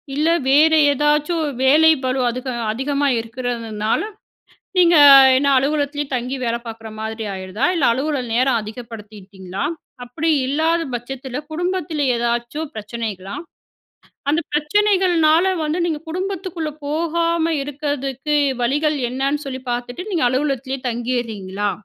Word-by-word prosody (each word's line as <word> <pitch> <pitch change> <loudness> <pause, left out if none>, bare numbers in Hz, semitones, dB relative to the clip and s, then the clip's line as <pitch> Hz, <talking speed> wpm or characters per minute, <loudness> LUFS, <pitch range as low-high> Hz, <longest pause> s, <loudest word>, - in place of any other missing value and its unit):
இல்ல 300 +3 +1 0.2
வேறு 315 +3 +5 0.2
ஏதாச்சும் 300 +3 +1 0.2
வேலை 310 +4 +6
பளு 255 +1 0
அதுக 255 +2 -5 0.2
அதிகமா 280 +5 -1
இருக்கிறதுனால, 230 -2 -2 0.8
நீங்க 345 -1 +6 0.4
என்ன 280 +1 +2
அலுவலகத்திலேயே 290 +1 -1
தங்கி 250 +3 -3
வேலை 235 0 -1
பார்க்குற 225 0 -8
மாதிரி 220 0 -4
ஆயிருதா? 190 +6 -4
இல்ல, 300 - +1
அலுவலக 270 0 -1
நேரம் 250 -2 +2
அதிகப்படுத்திட்டீங்களா? 210 -4 -8 0.4
அப்படி 315 +7 -2 0.2
இல்லாத 320 +5 +1
பட்சத்துல 255 +2 -6
குடும்பத்தில 340 -2 -2
ஏதாச்சும் 240 +6 -2
பிரச்சனைகளா? 210 -3 -5 0.9
அந்த 315 +3 +2
பிரச்சனைகள்னால 345 0 +3 0.2
வந்து 310 +3 -1
நீங்க 315 -3 -2
குடும்பத்துக்குள்ள 370 -2 -3 0.2
போகாம 335 +2 0
இருக்கிறதுக்கு 285 0 -3 0.3
வழிகள் 295 +5 +1
என்னன்னு 275 +4 -1
சொல்லி 265 -1 -5
பார்த்துட்டு, 245 +7 -4
நீங்க 330 -7 0
அலுவலகத்திலயே 270 0 -1
தங்கியிர்றீங்களா?" 225 -5 -3
275 Hz, 110 wpm, -20 LUFS, 235-310 Hz, 0.9 s, வேலை